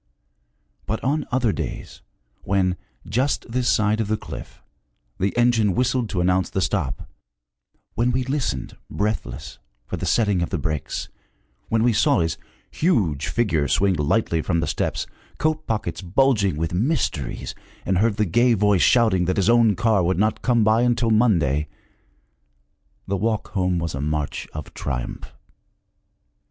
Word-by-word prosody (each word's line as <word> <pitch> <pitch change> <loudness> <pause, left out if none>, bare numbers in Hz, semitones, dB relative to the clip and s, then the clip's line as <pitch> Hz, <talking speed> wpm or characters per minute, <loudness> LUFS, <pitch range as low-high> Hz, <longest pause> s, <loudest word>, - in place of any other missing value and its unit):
But 110 - -3
on 145 +4 0
other 125 -3 +2
days, - - -6 0.4
when, 95 -2 +1 0.3
just 125 +7 0
this 125 +1 0
side 110 +1 +2
of 110 - -2
the 110 +1 0
cliff, - - -9 0.6
the 95 +1 +1
engine 115 -5 +3
whistled 125 -2 +1
to 90 -3 -1
announce 90 +1 +2
the - - -2
stop, 75 -8 -2 0.9
when 120 +2 +1
we 130 +1 0
listened, 130 - -3
breathless, 75 - -3 0.3
for - - -5
the - - -3
setting 105 -6 +2
of 85 - -1
the 95 - -2
brakes, 75 -2 -3 0.6
when 115 0 +2
we 120 -1 +3
saw 135 +3 +3
his 80 -1 -2 0.3
huge 95 - +1
figure 85 -11 +1
swing 100 -1 +2
lightly 80 +2 +1
from 85 +1 0
the - - 0
steps, - - -2 0.3
coat 155 0 -1
pockets 110 -2 -2
bulging 100 - +2
with 80 +1 -2
mysteries, 100 - -1 0.3
and 95 -1 +1
heard 110 0 +2
the 105 - +2
gay 120 +7 +3
voice 105 -3 +3
shouting 110 -8 +4
that 95 - -1
his 100 +3 +3
own 115 -3 +4
car 110 -4 +2
would 90 +1 +1
not 110 +2 +1
come 120 -3 +2
by 110 +2 +4
until 120 -1 +2
Monday, 85 - +2 1.4
the 100 - -1
walk 110 +2 -1
home 90 -3 0
was 85 -1 -2
a 70 - -3
march 75 0 -2
of 75 - -8
triumph. - - -5
105 Hz, 155 wpm, -23 LUFS, 85-120 Hz, 1.4 s, shouting